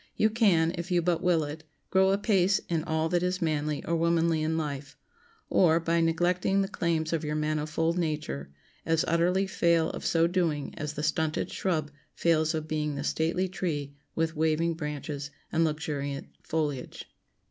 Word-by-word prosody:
You 215 - +3
can, 180 -8 +3
if 170 +3 -5
you 175 -2 +2
but 170 -1 +1
will 175 -3 +3
it, 150 +2 -6 0.3
grow 190 0 +4
apace 195 -1 +3
in 165 -2 0
all 160 -1 0
that 175 0 +1
is 180 0 0
manly 150 -3 -1
or 170 - 0
womanly 165 -1 +2
in 160 +1 0
life; 145 -3 -4 0.5
or, 165 -3 +4
by 165 0 +1
neglecting 175 +4 +2
the - - -2
claims 165 -4 -1
of 165 -1 0
your 150 0 -2
manifold 155 +2 0
nature, 150 - -3 0.3
as 165 -1 +1
utterly 175 +4 +2
fail 170 -3 +2
of - - -7
so 165 0 +3
doing 170 -5 0
as 150 0 -4
the 150 - -4
stunted 160 0 0
shrub 155 -6 -1 0.2
fails 160 -1 +2
of 155 0 -3
being 150 -2 -1
the 140 - -3
stately 165 +5 0
tree 150 -6 -3 0.2
with 165 0 0
waving 160 +2 +1
branches 150 -2 -5 0.2
and 165 - +2
luxuriant 150 -3 -2
foliage. 150 -5 -3
160 Hz, 170 wpm, -28 LUFS, 150-170 Hz, 0.5 s, grow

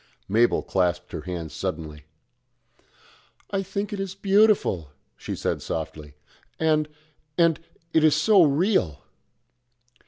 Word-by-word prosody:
Mabel 115 +4 +2
clasped 90 -2 -1
her - - -5
hands 85 -4 -6
suddenly. 80 -6 -5 1.5
"I 195 -1 0
think 200 +2 -4
it 200 - -4
is 195 -1 -4
beautiful," 195 - +2 0.3
she - - -6
said - - -2
softly, 75 -2 -6 0.4
"and 155 -1 +2 0.5
and 165 -2 +3 0.3
it 160 - +4
is 155 -1 +5
so 190 +6 +5
real." 145 - +2
150 Hz, 115 wpm, -25 LUFS, -, 1.5 s, is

